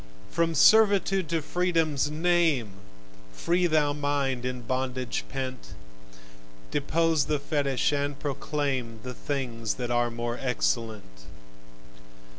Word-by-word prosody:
From 165 0 +1
servitude 195 -1 +5
to 165 -2 -1
freedom's 165 -4 +1
name 160 - +2 0.6
Free 175 - +1
thou 150 -3 +2
thy 150 - -8
mind 140 -3 -1
in 125 -1 -4
bondage 130 +1 -2
pent; 130 -1 -5 1.0
Depose 160 +1 +1
the 150 0 0
fetich, 140 -1 0
and 145 0 -1
proclaim 140 -5 -2
The 125 - -5
things 120 -6 -3
that 120 -1 -4
are 120 0 +2
more 120 +1 -4
excellent. 110 - -2
140 Hz, 110 wpm, -27 LUFS, 125-160 Hz, 1.0 s, servitude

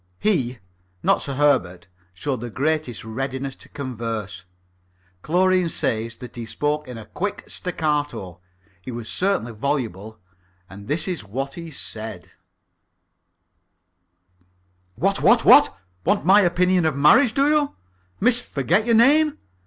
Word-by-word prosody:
He 130 - 0 0.5
not - - +3
Sir 140 - -3
Herbert 125 -12 +1 0.2
showed 120 +8 -4
the 120 - -5
greatest 140 -1 -2
readiness 130 +3 -4
to - - -16
converse. 115 -8 -5 0.8
Chlorine 180 - +2
says 115 -5 -1
that 125 - -11
he 115 -2 -6
spoke 150 +4 -2
in 125 -2 -8
a 110 - -9
quick 205 - -4
staccato. 145 - -3 0.4
He 90 - -9
was 120 -2 -6
certainly 185 - -1
voluble, 110 -4 -3 0.5
and 100 +2 -12
this 155 +6 0
is 180 - -3
what 135 +7 -5
he 170 -1 -8
said: 110 - -8 2.6
"What, - - 0
what, - - +4
what? - - +7 0.3
Want 200 +4 +1
my 195 +3 +6
opinion 180 -1 +2
of 155 - -1
marriage, 215 - +5
do 275 +1 +3
you, 300 -1 +1 0.4
Miss 245 +3 +3
Forget 175 - 0
your 230 - +4
name? 290 +6 +4
140 Hz, 130 wpm, -22 LUFS, 115-180 Hz, 2.6 s, what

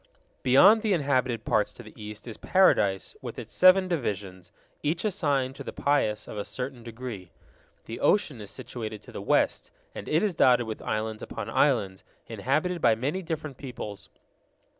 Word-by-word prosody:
Beyond 190 - +6
the 215 -2 +1
inhabited 130 -7 0
parts 105 - +1
to 120 - -12
the 110 - -13
east 105 +1 -9
is 115 - -6
Paradise 100 - +2
with - - -7
its - - -7
seven 185 +1 +6
divisions, 100 - -4 0.3
each 160 +6 -1
assigned 140 -9 0
to - - -7
the - - -6
pious 110 -7 0
of 105 - -6
a - - -2
certain 125 +1 -6
degree. 115 -5 -8 0.6
The 115 - -7
ocean 150 - +2
is 100 - -8
situated 110 -2 -7
to - - -13
the - - -6
west, - - +1 0.2
and - - -7
it 160 +5 +2
is 205 -3 +1
dotted 125 -6 +4
with 110 -1 -6
islands 110 0 -3
upon - - -6
islands, 105 -10 +1 0.2
inhabited 155 +6 -1
by 115 -2 +5
many 145 +11 -2
different 155 -5 -5
peoples. 105 -7 -8
125 Hz, 170 wpm, -27 LUFS, 110-155 Hz, 0.6 s, Beyond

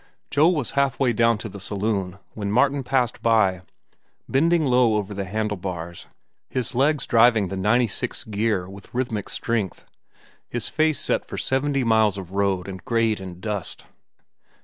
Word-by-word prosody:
Joe 155 +4 +5
was 150 -9 -1
halfway 135 -2 +1
down 115 0 +3
to 105 - -6
the 100 -1 -9
saloon 100 -2 -2 0.2
when 100 -2 -3
Martin 135 +5 +3
passed 125 -2 0
by, 100 -6 +3 0.7
bending 165 +4 +2
low 125 -4 +4
over 105 -1 -2
the 100 0 -4
handle 105 +1 -2
bars, 85 -2 -6 0.4
his 130 0 -2
legs 140 +4 +2
driving 115 -4 +4
the 95 - -4
ninety 105 +6 +3
six 110 - -4
gear 105 -3 -1
with 100 +1 -12
rhythmic 120 -5 -2
strength, 110 -5 -2 0.6
his 120 -2 -3
face 155 -2 +2
set - - +1
for - - -8
seventy 135 0 0
miles 110 -3 +3
of 95 -2 -8
road 100 -2 0
and 95 -2 -7
grade 115 -3 +1
and 90 -1 -9
dust. 105 -3 -4
110 Hz, 160 wpm, -23 LUFS, 100-125 Hz, 0.7 s, Joe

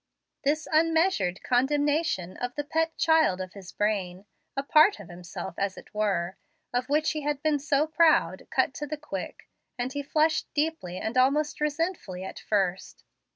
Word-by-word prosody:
This 305 +2 0
unmeasured 325 - +2
condemnation 285 - +1
of 245 0 -4
the 290 - -2
pet 320 +2 -1
child 320 - +3
of 185 -1 -6
his 195 -3 -10
brain, 195 -3 -1 0.3
a 275 - 0
part 305 +8 +5
of 195 - -11
himself 175 -1 -7
as 195 -1 -1
it - - -13
were, 195 -4 -1 0.4
of 250 +1 -1
which 300 +2 +2
he 305 - -3
had 295 0 -2
been 305 -2 +2
so 290 +1 +2
proud, 320 0 +3
cut - - +1
to 295 - -4
the 305 +1 -4
quick, 195 -11 -7 0.3
and 250 +2 -3
he 285 - -2
flushed 310 +2 +1
deeply 295 - -1
and 225 +6 -1
almost 290 +4 +2
resentfully 300 - -2
at 190 - -7
first. 190 -3 -1
280 Hz, 165 wpm, -27 LUFS, 195-310 Hz, 0.4 s, part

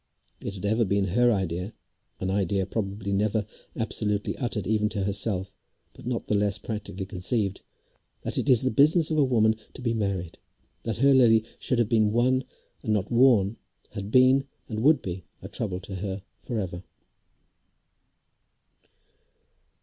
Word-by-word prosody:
It 100 - -5
had 100 - -6
ever 110 +3 +2
been 100 -1 +1
her 120 +6 +4
idea, 95 -1 -2 0.5
an 95 0 -2
idea 95 0 0
probably 100 -1 -3
never 105 +1 +1 0.3
absolutely 105 -2 -1
uttered 120 -6 -3
even 105 0 +1
to 100 -3 -2
herself, 100 -1 0 0.4
but - - -11
not 120 -2 -2
the - - -1
less 105 0 +2
practically 105 -3 -5
conceived, 95 +1 -1 0.6
that - - -3
it - - -1
is 125 -2 +6
the 130 - +1
business 155 +6 +4
of 155 - +2
a - - +6
woman 110 -4 +3 0.2
to - - -9
be 115 -2 +1
married. 100 -6 -2 0.5
That 115 -3 -2
her 135 +3 +5
Lily 115 -4 +5
should 125 - -1
have 120 -2 +2
been 110 -2 +3
won 130 +2 +2 0.4
and 110 - 0
not 100 +2 -2
worn, 115 -4 +4 0.3
had 100 -1 -6
been, 130 +2 +5 0.2
and 110 -1 -4
would 150 +5 +4
be, 90 -1 -5 0.2
a - - -8
trouble 95 -4 -3
to 100 - -9
her 95 0 -4 0.2
for 120 - -4
ever. 90 -3 -4
105 Hz, 160 wpm, -26 LUFS, 100-120 Hz, 0.6 s, is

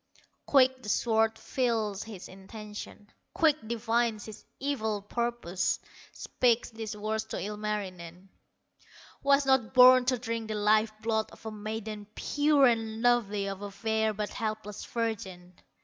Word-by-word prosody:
Quick 260 -2 +4
the 210 - -7
sword 225 0 +2
feels 225 -6 -1
his 210 -5 -8
intention, 210 +2 -10 0.2
Quick 310 -3 +4
divines 230 -1 0
his 215 -2 -10 0.2
evil 220 -7 -2
purpose, 235 -5 -1 0.3
Speaks 245 -1 0
these 220 -1 -6
words 215 +1 -2
to 220 - -5
Ilmarinen: 195 -4 -5 0.9
"Was 280 0 +4
not 265 -3 +2
born 255 0 +8
to 255 0 +2
drink 230 -1 -4
the 215 - -3
life 215 +1 +3
blood 220 -1 0
Of - - -17
a 220 - -4
maiden 215 0 -6
pure 290 -1 +3
and 225 -2 0
lovely, 215 -5 +2
Of 195 0 -5
a 205 - -5
fair 220 +2 0
but 210 0 -3
helpless 215 -3 -4
virgin." 190 -6 -4
220 Hz, 135 wpm, -29 LUFS, 210-240 Hz, 0.9 s, born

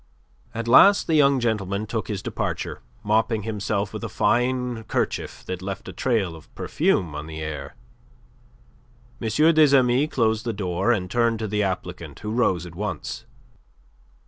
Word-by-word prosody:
At 115 0 -3
last 200 +12 +7
the 165 - -1
young 140 -3 +5
gentleman 105 -3 -1
took 110 +1 -3
his 100 -3 -4
departure, - - -3 0.2
mopping 110 +1 +1
himself 105 -2 -2
with - - -6
a - - -3
fine 125 -1 0
kerchief - - -3
that 90 -1 -5
left 95 0 -6
a - - -7
trail 105 -10 0
of 80 - -15
perfume 85 -5 0
on 75 +1 -6
the 80 -1 -7
air. 75 -2 -6 1.5
M. 115 - -1 0.2
des 150 -3 +6
Amis 130 +3 +2
closed 110 -5 +1
the 115 - -2
door, 95 +2 0
and 95 -6 -1
turned 115 -1 +2
to 110 0 -3
the 105 +1 0
applicant, 90 -6 -4
who 105 - -4
rose 95 -7 +1
at 85 - -10
once. 105 +4 -5
110 Hz, 160 wpm, -24 LUFS, 95-120 Hz, 1.5 s, last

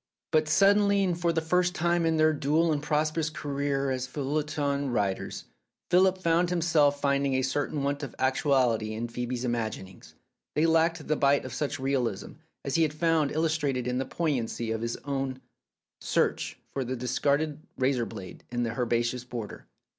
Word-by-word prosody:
But 155 -1 +3
suddenly, 200 +3 +4
and 180 -3 +1
for 170 -1 +2
the 165 -1 0
first 180 +3 +1
time 170 0 +1
in 160 -1 +2
their 155 0 +4
dual 155 +3 +2
and 145 -2 0
prosperous 155 +1 0
career 140 -2 -2
as 130 -1 -2
feuilleton 145 0 -1
writers, 100 -5 -2 0.5
Philip 185 +1 +5
found 170 -1 +2
himself 155 -5 +2
finding 140 -1 +1
a 130 - +1
certain 140 +2 -1
want 140 +1 -1
of 140 - -6
actuality 130 -5 +1
in 115 +2 -4
Phoebe's 125 +1 -3
imaginings. 110 -6 -4 0.4
They 155 - +3
lacked 165 0 +2
the 155 - +2
bite 140 0 +3
of - - -6
such 145 -1 -2
realism 130 -6 -1 0.3
as 140 - -2
he 165 - +3
had 155 -2 +1
found 160 -2 +2
illustrated 150 -5 0
in 125 0 -1
the 135 - -1
poignancy 125 -7 -2
of 110 0 -2
his 115 0 -2
own 135 -2 -2 0.6
search - - 0 0.2
for 135 - -1
the 130 +1 -3
discarded 140 +5 0 0.2
razor 130 -2 +1
blade 95 -5 -9
in 120 0 -1
the 115 - -1
herbaceous 120 0 0
border. 120 -4 -7
140 Hz, 170 wpm, -28 LUFS, 125-160 Hz, 0.6 s, Philip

